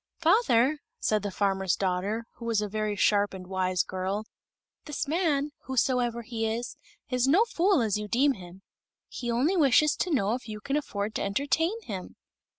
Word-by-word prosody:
"Father," 310 - +3 0.2
said 215 -1 +1
the 205 - -3
farmer's 190 -1 0
daughter, 195 +4 -1
who 235 - -8
was 230 -2 +1
a 210 - -1
very 215 0 -2
sharp 205 0 +2
and 185 -1 -8
wise 185 -1 0
girl, 190 +3 -3 0.6
"this 295 0 -3
man, 300 -3 +1
whosoever 245 -2 0
he 225 -1 -2
is, 230 +3 -3 0.4
is 250 0 +2
no 365 +11 +5
fool, 365 - +2
as 210 -2 +1
you 210 - -5
deem 270 +6 +3
him. 185 -2 -12 0.5
He 240 - -5
only 260 +11 +2
wishes 300 -2 +4
to 360 - -1
know 220 - +1
if 250 0 -5
you 215 -1 -6
can 275 +6 -2
afford 215 -8 -2
to - - -2
entertain 290 - 0
him." 190 - -7
230 Hz, 175 wpm, -28 LUFS, 200-280 Hz, 0.6 s, no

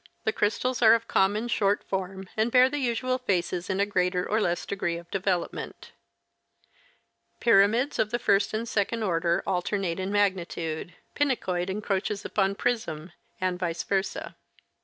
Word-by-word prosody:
The 220 - 0
crystals 240 +4 0
are 225 -1 +8
of 230 - -2
the - - -31
common 205 +4 +2
short 205 -4 +1
form 190 0 -4
and 220 +2 +1
bear 255 +1 +6
the 290 +2 -3
usual 255 0 0
faces 180 -5 -1
in 190 0 0
a 200 - +3
greater 180 -2 0
or 215 +1 +1
less 175 -3 0
degree 175 -4 -2
of 170 0 -12
development. 190 -2 -3 1.5
Pyramids 230 +5 +3
of 210 - +2
the 240 - 0
first 200 -4 +2
and 220 +2 -3
second 220 +1 -1
order 170 -3 +1
alternate 185 -1 -1
in 190 +1 -2
magnitude; 175 -5 -1 0.2
pinacoid 190 -11 0
encroaches 200 0 -2
upon 195 -1 +1
prism, 200 -9 -2 0.3
and 185 -1 -1
vice 170 -2 -2
versa. 195 -1 -2
195 Hz, 155 wpm, -27 LUFS, 180-225 Hz, 1.5 s, are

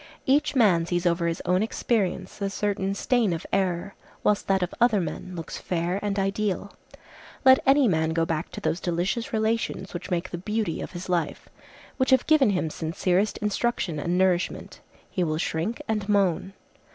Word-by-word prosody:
Each 280 +2 +2
man 185 -9 +4
sees 175 0 -1
over 170 0 +2
his 165 0 -2
own 180 +1 +2
experience 205 -4 -1
a 200 - 0
certain 195 -1 -1
stain 230 -3 +1
of 165 - -5
error, 185 0 0 0.3
whilst 210 -1 +1
that 190 -1 +2
of 180 - -3
other 230 -4 +5
men 180 +2 -5
looks 165 -2 -6
fair 175 +2 -1
and 205 -1 -2
ideal. 195 0 -1 0.7
Let 260 0 +8
any 275 -1 +6
man 160 -4 +1
go 165 0 +1
back 165 -1 -2
to - - -5
those 170 - 0
delicious 185 +10 -1
relations 220 -3 -1
which 180 +1 -6
make 180 0 -2
the 175 - -4
beauty 210 -2 -2
of - - -7
his 175 0 -6
life, 175 -4 -2 0.5
which 260 - +1
have 260 -1 +4
given 305 -6 +5
him 180 -5 0
sincerest 180 +6 0
instruction 210 -6 -1
and 175 +4 -1
nourishment, 185 -1 0 0.3
he 185 - -1
will 155 -2 -1
shrink 165 +7 -2
and 210 -2 -2
moan. 195 -2 +1
190 Hz, 175 wpm, -26 LUFS, 175-210 Hz, 0.7 s, Let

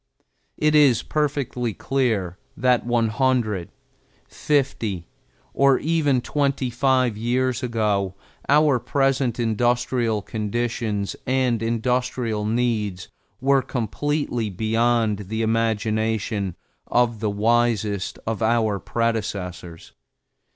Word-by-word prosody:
It 150 0 +2
is 145 -6 +5
perfectly 135 -7 -1
clear 105 -6 -1 0.2
that 125 -2 +2
one 120 -2 +2
hundred, 110 -7 0 0.6
fifty, 120 - -1 0.5
or 140 -1 +4
even 145 -5 +1
twenty 140 -2 -1
five 130 -2 +2
years 125 +3 0
ago 105 -6 0 0.3
our 145 -2 +4
present 135 -2 0
industrial 120 -1 +1
conditions 110 -1 -2
and 130 -3 +1
industrial 115 -1 -1
needs 110 -5 -1 0.3
were 135 +1 +3
completely 125 0 -2
beyond 110 +1 +1
the 110 +1 -1
imagination 110 -3 0 0.3
of 120 -2 +1
the 110 0 -1
wisest 110 -2 +1
of 110 0 -3
our 110 -3 +2
predecessors. 100 -8 -3
115 Hz, 95 wpm, -23 LUFS, 110-130 Hz, 0.6 s, is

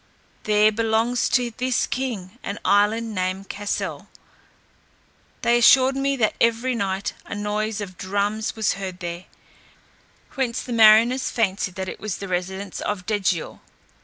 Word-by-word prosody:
There 210 0 +4
belongs 225 +2 +1
to 245 -2 +1
this 255 0 0
king 240 -5 -4
an 200 - -4
island 215 +2 +2
named 185 0 -3
Cassel. 205 0 -4 1.4
They 240 0 +4
assured 260 +2 +6
me 275 0 0
that 220 -5 +1
every 235 +2 +2
night 195 -3 -2
a - - -5
noise 210 +1 -2
of 185 -3 -8
drums 205 +3 -1
was 220 -2 +1
heard 185 -1 -6
there, 175 0 -6 1.1
whence 255 -3 -2
the 245 - -5
mariners 230 +3 +5
fancied 195 -4 -1
that 190 -1 -4
it - - -6
was 210 -2 -4
the 195 - -6
residence 190 +2 -4
of 200 -3 -3
Degial. 195 -5 -1
210 Hz, 140 wpm, -23 LUFS, 195-235 Hz, 1.4 s, assured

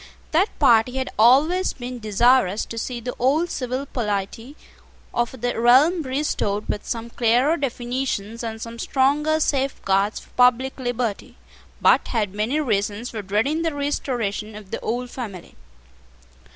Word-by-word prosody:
That 360 +7 +3
party 245 -4 +4
had 260 - -2
always 295 +11 +4
been 250 -1 -7
desirous 220 -1 +3
to 230 - -8
see 245 +1 -4
the 245 +1 -5
old 300 +7 +2
civil 255 +1 -3
polity 225 +1 -4 0.6
of 240 +1 -2
the 245 -1 -1
realm 270 +9 +5
restored 260 -7 -2
with 210 - -4
some 235 0 -4
clearer 245 +7 +2
definitions 245 -5 -3
and 225 -1 -5
some 230 +1 -8
stronger 295 +5 +1
safeguards 215 -9 0
for - - -20
public 250 +2 +3
liberty, 245 -4 -3 0.4
but - - +4
had 210 -5 -1
many 220 +9 0
reasons 215 -3 -1
for 220 - -5
dreading 220 +11 0
the 325 -3 -1
restoration 235 -7 -2
of 210 -2 -11
the - - -3
old 245 +2 -3
family. 205 -9 -7
245 Hz, 140 wpm, -22 LUFS, 220-270 Hz, 0.6 s, realm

